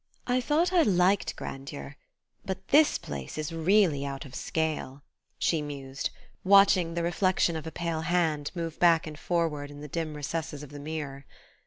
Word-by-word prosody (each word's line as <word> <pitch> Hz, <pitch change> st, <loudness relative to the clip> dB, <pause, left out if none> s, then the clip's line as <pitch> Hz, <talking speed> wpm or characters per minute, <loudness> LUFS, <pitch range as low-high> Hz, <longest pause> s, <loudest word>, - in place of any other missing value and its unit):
"I 250 Hz, 0 st, +1 dB
thought 320 Hz, +7 st, +1 dB
I 355 Hz, -, +6 dB
liked 195 Hz, -, +3 dB
grandeur; 135 Hz, -, -7 dB, 0.5 s
but 190 Hz, 0 st, -5 dB
this 300 Hz, +1 st, +5 dB
place 70 Hz, -2 st, -7 dB
is 155 Hz, +1 st, -3 dB
really 165 Hz, -3 st, +3 dB
out 140 Hz, 0 st, -5 dB
of 135 Hz, -, -12 dB
scale," 155 Hz, -4 st, -2 dB, 0.3 s
she 165 Hz, -3 st, +1 dB
mused, 140 Hz, -2 st, -4 dB, 0.3 s
watching 190 Hz, -3 st, +5 dB
the 170 Hz, -, -1 dB
reflection 175 Hz, 0 st, +2 dB
of 160 Hz, 0 st, -5 dB
a -, -, -5 dB
pale 170 Hz, -2 st, -2 dB
hand 160 Hz, -4 st, +1 dB
move 165 Hz, -2 st, -4 dB
back 170 Hz, -2 st, +5 dB
and 155 Hz, -1 st, -8 dB
forward 160 Hz, -5 st, -1 dB
in 145 Hz, 0 st, -10 dB
the 150 Hz, -, -7 dB
dim 155 Hz, 0 st, -3 dB
recesses 150 Hz, 0 st, -4 dB
of 145 Hz, -, -11 dB
the 145 Hz, -, -8 dB
mirror. 145 Hz, -2 st, -6 dB
160 Hz, 170 wpm, -28 LUFS, 145-180 Hz, 0.5 s, I